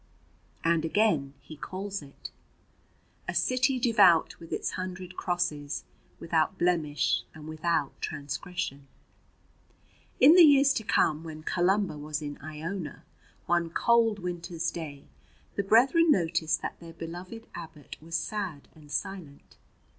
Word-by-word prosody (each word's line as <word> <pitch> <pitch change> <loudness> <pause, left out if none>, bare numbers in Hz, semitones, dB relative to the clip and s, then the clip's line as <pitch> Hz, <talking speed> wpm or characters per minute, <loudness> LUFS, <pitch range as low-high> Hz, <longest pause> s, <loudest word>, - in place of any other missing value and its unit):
And 165 -1 +2
again 160 -7 +1
he 155 - -11
calls 195 +5 -5
it: 140 -1 -11 1.0
A - - -3
city 255 +1 +2
devout 205 -9 +4
with 165 - -12
its - - -2
hundred 185 0 -6
crosses, 175 -6 -2 0.4
Without 165 +2 0
blemish 155 -7 +1
and 155 0 -10
without 155 -2 -1
transgression. 140 -1 -4 1.3
In 285 +5 +9
the 360 - +8
years 280 -3 +7
to 225 - -2
come, 155 -6 +2
when 155 -1 -8
Columba 185 -2 +1
was 150 0 -3
in 145 -2 -6
Iona, 155 +2 -6 0.4
one 175 -1 +1
cold 230 +3 +3
winter's 175 -2 -3
day 145 -4 -7 0.5
the - - +1
brethren 265 - +5
noticed 165 - +2
that - - -5
their 165 -1 -11
beloved 175 +7 -8
abbot 160 -4 -9
was 165 +1 -6
sad 175 -4 -3
and 150 -2 -16
silent. 150 -1 -5
170 Hz, 125 wpm, -28 LUFS, 155-195 Hz, 1.3 s, In